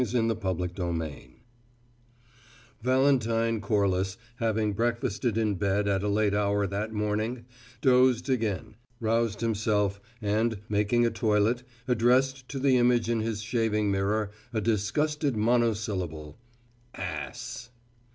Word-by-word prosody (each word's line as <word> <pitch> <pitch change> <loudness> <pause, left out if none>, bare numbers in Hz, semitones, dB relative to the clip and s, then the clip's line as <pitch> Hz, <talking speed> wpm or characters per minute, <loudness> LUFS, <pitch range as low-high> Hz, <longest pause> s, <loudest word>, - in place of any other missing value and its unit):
CHAPTER 110 -6 0
TWENTY 85 -4 -5 1.4
Valentine 115 -3 +2
Corliss, 100 -1 0 0.2
having 110 -2 0
breakfasted 115 0 -1
in 110 -2 +1
bed 100 +1 0
at 100 -1 +1
a 105 - -1
late 105 0 +2
hour 100 0 +1
that 100 +3 -3
morning, 110 +3 -2 0.4
dozed 125 -1 +4
again, 110 -4 -1 0.2
roused 115 -1 0
himself, 105 -3 0 0.2
and, 110 +1 0
making 105 +3 +2
a 115 - +1
toilet, 110 +2 +1 0.3
addressed 125 +2 +2
to 140 - -5
the 135 -1 +3
image 120 -2 +3
in 115 - +1
his 110 -1 -2
shaving 110 -2 0
mirror 100 +2 0 0.2
a 110 - -1
disgusted 120 +6 0
monosyllable. 105 -9 0 0.6
"Ass!" 90 +6 -6
110 Hz, 110 wpm, -28 LUFS, 100-120 Hz, 1.4 s, dozed